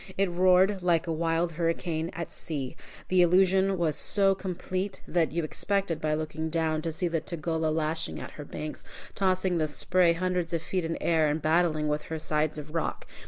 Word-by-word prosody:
It 195 Hz, -2 st, +2 dB
roared 185 Hz, +2 st, +4 dB
like 170 Hz, -2 st, +2 dB
a 165 Hz, -, -2 dB
wild 165 Hz, +1 st, 0 dB
hurricane 165 Hz, 0 st, -1 dB
at 170 Hz, -1 st, -5 dB
sea. 140 Hz, -5 st, -4 dB, 0.3 s
The 185 Hz, -1 st, +4 dB
illusion 190 Hz, +2 st, +4 dB
was 165 Hz, -3 st, +1 dB
so 195 Hz, -1 st, +3 dB
complete, 185 Hz, +1 st, -4 dB
that 170 Hz, -2 st, +1 dB
you 170 Hz, +2 st, -1 dB
expected, 195 Hz, +2 st, -1 dB
by 155 Hz, 0 st, +1 dB
looking 155 Hz, +1 st, -3 dB
down, 160 Hz, -1 st, 0 dB
to 165 Hz, 0 st, -2 dB
see 175 Hz, +3 st, -1 dB
the 165 Hz, -2 st, -1 dB
Tugela 160 Hz, -1 st, -2 dB
lashing 160 Hz, +1 st, -1 dB
at -, -, -7 dB
her 150 Hz, -, -8 dB
banks, 150 Hz, +1 st, -6 dB, 0.3 s
tossing 185 Hz, -2 st, +1 dB
the 155 Hz, -, +1 dB
spray 175 Hz, +3 st, +3 dB
hundreds 180 Hz, -1 st, -1 dB
of 165 Hz, -1 st, -1 dB
feet 180 Hz, +1 st, -2 dB
in 165 Hz, 0 st, -2 dB
air, 160 Hz, -2 st, +3 dB
and 150 Hz, +2 st, 0 dB
battling 155 Hz, -1 st, +2 dB
with 150 Hz, 0 st, 0 dB
her 160 Hz, -, -2 dB
sides 155 Hz, 0 st, -1 dB
of 150 Hz, +1 st, -8 dB
rock. 165 Hz, -, -2 dB
165 Hz, 190 wpm, -28 LUFS, 155-180 Hz, 0.3 s, roared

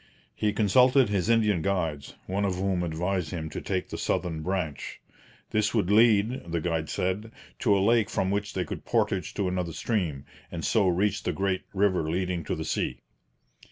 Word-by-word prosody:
He 105 Hz, -, 0 dB
consulted 125 Hz, +5 st, +4 dB
his 100 Hz, 0 st, 0 dB
Indian 105 Hz, -6 st, +3 dB
guides, 80 Hz, -6 st, -2 dB
one 95 Hz, +2 st, -1 dB
of 95 Hz, -2 st, 0 dB
whom 95 Hz, -1 st, 0 dB
advised 90 Hz, +1 st, -1 dB
him 80 Hz, -3 st, -5 dB
to -, -, -5 dB
take 95 Hz, -2 st, -2 dB
the -, -, -5 dB
southern 80 Hz, -3 st, -1 dB
branch. 90 Hz, -4 st, -3 dB, 0.5 s
This 105 Hz, +1 st, +1 dB
would 100 Hz, -4 st, +1 dB
lead, 110 Hz, +2 st, +4 dB
the 85 Hz, -, 0 dB
guide 80 Hz, -1 st, -2 dB
said, 100 Hz, +4 st, -2 dB, 0.3 s
to 105 Hz, -4 st, +3 dB
a 95 Hz, -, +2 dB
lake 115 Hz, -1 st, +3 dB
from 95 Hz, 0 st, 0 dB
which 100 Hz, +1 st, -2 dB
they -, -, -1 dB
could -, -, -6 dB
portage -, -, 0 dB
to 100 Hz, -, 0 dB
another 90 Hz, -2 st, -2 dB
stream, 80 Hz, -, -2 dB, 0.3 s
and 80 Hz, -2 st, -4 dB
so 105 Hz, -4 st, +3 dB
reach 95 Hz, +3 st, +1 dB
the 90 Hz, -, -2 dB
great 95 Hz, +2 st, -1 dB
river 95 Hz, -5 st, +1 dB
leading 90 Hz, 0 st, -1 dB
to -, -, -2 dB
the -, -, -4 dB
sea. -, -, -2 dB
95 Hz, 185 wpm, -27 LUFS, 85-105 Hz, 0.5 s, consulted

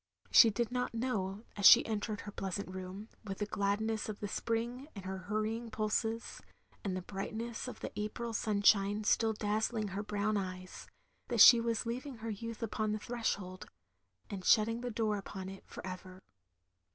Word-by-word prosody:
She 230 Hz, -, +9 dB
did 235 Hz, +2 st, -1 dB
not 250 Hz, -1 st, -2 dB
know, 215 Hz, -4 st, -2 dB
as 200 Hz, -, +6 dB
she 240 Hz, -, +9 dB
entered 215 Hz, -1 st, -3 dB
her 205 Hz, -, -8 dB
pleasant 195 Hz, -1 st, -4 dB
room, 190 Hz, +3 st, -7 dB, 0.2 s
with 195 Hz, -3 st, -5 dB
the 210 Hz, -, -1 dB
gladness 210 Hz, +2 st, -1 dB
of 210 Hz, -, -5 dB
the 205 Hz, -, -3 dB
spring 235 Hz, +5 st, -2 dB
in 195 Hz, -, -7 dB
her 190 Hz, 0 st, -4 dB
hur 215 Hz, 0 st, +1 dB
rying 225 Hz, +2 st, -3 dB
ptdses, 220 Hz, +1 st, -2 dB, 0.4 s
and 185 Hz, -2 st, -2 dB
the 185 Hz, -, -5 dB
brightness 220 Hz, +6 st, -5 dB
of 250 Hz, -, -8 dB
the -, -, -4 dB
April 225 Hz, +3 st, -4 dB
sun 210 Hz, -1 st, -1 dB
shine 205 Hz, +1 st, +4 dB
still 220 Hz, +1 st, +3 dB
dazzling 215 Hz, +1 st, -1 dB
her 195 Hz, +2 st, -3 dB
brown 210 Hz, 0 st, -1 dB
eyes, 185 Hz, -1 st, -6 dB, 0.4 s
that 240 Hz, -2 st, -1 dB
she 235 Hz, +2 st, +10 dB
was 230 Hz, -1 st, -1 dB
leaving 255 Hz, +4 st, -4 dB
her 225 Hz, 0 st, -5 dB
youth 230 Hz, +2 st, -6 dB
upon 215 Hz, -1 st, -1 dB
the -, -, -1 dB
threshold 205 Hz, -5 st, -3 dB, 0.3 s
— 95 Hz, 0 st, -41 dB
^and 195 Hz, -2 st, -5 dB
shut 215 Hz, +2 st, +6 dB
ting 230 Hz, +1 st, -3 dB
the 245 Hz, -, -3 dB
door 215 Hz, -2 st, 0 dB
upon 190 Hz, -1 st, -7 dB
it, 195 Hz, 0 st, -10 dB
for -, -, -9 dB
ever. 185 Hz, 0 st, -8 dB
215 Hz, 190 wpm, -33 LUFS, 195-230 Hz, 0.4 s, she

